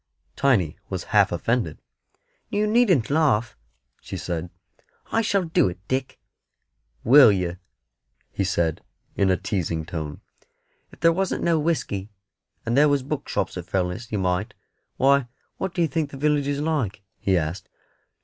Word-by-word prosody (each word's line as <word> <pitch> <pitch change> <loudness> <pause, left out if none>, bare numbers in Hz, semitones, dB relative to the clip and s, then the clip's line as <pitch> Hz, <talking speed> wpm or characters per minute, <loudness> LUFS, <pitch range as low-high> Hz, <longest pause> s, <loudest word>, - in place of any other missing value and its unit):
Tiny 110 - +2
was - - -3
half - - +5
offended. 115 -10 -1 0.7
"You 210 +1 +1
needn't 210 - +3
laugh," 135 -8 +2 0.5
she - - -6
said; 85 0 -4 0.6
"I 225 - +2
shall 200 -3 +1
do 160 - +2
it, 90 - -7
Dick." 130 0 -2 0.9
"Will 130 -1 +8
yer?" 90 -2 -2 0.7
he 100 - -1
said, 85 -5 0 0.3
in 95 - +2
a 95 - +3
teasing 85 -5 -2
tone. 80 -3 -6 0.7
"If - - -18
there 165 0 +5
wasn't 190 +2 -1
no 165 -2 +3
whisky, 125 - -1 0.6
and 115 - 0
there 145 +2 +5
was 140 -2 +1
bookshops 145 -7 -3
at 90 -1 -7
Fellness, 95 +5 -2
you 105 - -1
might. 90 +1 -1 0.4
Why, 140 -1 +4 0.3
what 190 - -2
do 175 -1 0
you - - +2
think 150 +1 -2
the 135 - -9
village 145 0 +1
is 145 0 -1
like?" 125 -11 -1 0.2
he 95 -2 +2
asked. 80 +3 -3
120 Hz, 150 wpm, -24 LUFS, 90-150 Hz, 0.9 s, Will